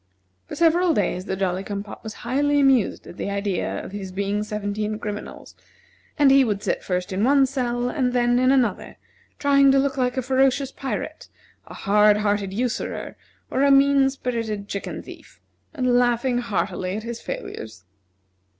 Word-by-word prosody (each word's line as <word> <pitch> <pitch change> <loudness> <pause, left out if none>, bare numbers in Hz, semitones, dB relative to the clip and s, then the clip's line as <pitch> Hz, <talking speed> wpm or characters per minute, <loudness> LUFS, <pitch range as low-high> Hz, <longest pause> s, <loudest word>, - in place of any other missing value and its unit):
For - - -7
several 340 +1 +3
days 185 -2 -1
the 190 - -2
Jolly 190 -1 -1
cum 200 0 -4
pop 205 - -11
was 220 -1 -7
highly 290 +4 +2
amused 270 -6 +2
at - - -11
the - - -3
idea 200 -2 -2
of - - -9
his 195 -2 -6
being 200 +2 -1
seventeen 210 0 -3
criminals, 210 -1 -7 0.6
and 285 -3 +5
he 270 0 +6
would 210 -4 -2
sit - - -1
first 180 0 -2
in 195 +3 0
one 275 +2 +5
cell 245 -2 -2
and 250 -1 0
then 245 0 +2
in 255 +1 +4
another, 245 -8 0 0.4
trying 275 -1 +4
to 275 - +4
look 275 0 +1
like 250 0 0
a 260 - 0
ferocious 265 +1 +2
pirate, 270 -1 -5 0.4
a - - -10
hard 210 +1 +4
hearted 205 -2 0
usurer, 235 +4 -3 0.4
or 260 - 0
a 280 - +4
mean 275 0 +5
spirited 230 -6 -4
chicken 200 - -5
thief, - - -14 0.3
and 255 -5 0
laughing 245 0 +2
heartily 195 -4 -2
at 215 - -6
his 235 0 -6
failures. 110 -5 -7
240 Hz, 170 wpm, -23 LUFS, 205-270 Hz, 0.6 s, he